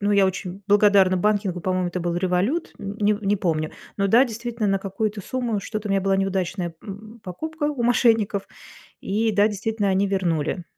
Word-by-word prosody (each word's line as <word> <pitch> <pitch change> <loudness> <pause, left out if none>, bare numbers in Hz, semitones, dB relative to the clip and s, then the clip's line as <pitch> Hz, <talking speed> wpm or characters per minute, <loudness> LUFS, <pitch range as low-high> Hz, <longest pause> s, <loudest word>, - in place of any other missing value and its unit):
Ну, 205 0 +1
я 200 -1 +5
очень 190 +1 -4
благодарна 200 -2 +5
банкингу, 200 -2 0
по-моему, 185 0 0
это 180 +1 -4
был 175 0 -1
"Револют", 185 - 0
нь 200 +1 -6
не 210 0 +4
не 205 0 +1
помню. 155 -4 -1 0.3
Но 200 -1 +1
да, 240 +6 +6
действительно, 230 -1 -3
на 195 0 +2
какую-то 205 +2 -3
сумму. 240 -5 -2
Что-то 215 0 -5
у - - -2
меня 195 - +2
была 195 0 +1
неудачная, 190 -2 -2
м, 215 +2 -10
покупка 315 - -5
у 295 -5 -1
мошенников, 225 -4 +2 0.5
и 220 +3 0
да, 205 +1 +4
действительно, 210 0 -1
они 195 +1 +2
вернули. 175 -3 -1
200 Hz, 185 wpm, -23 LUFS, 185-215 Hz, 0.5 s, да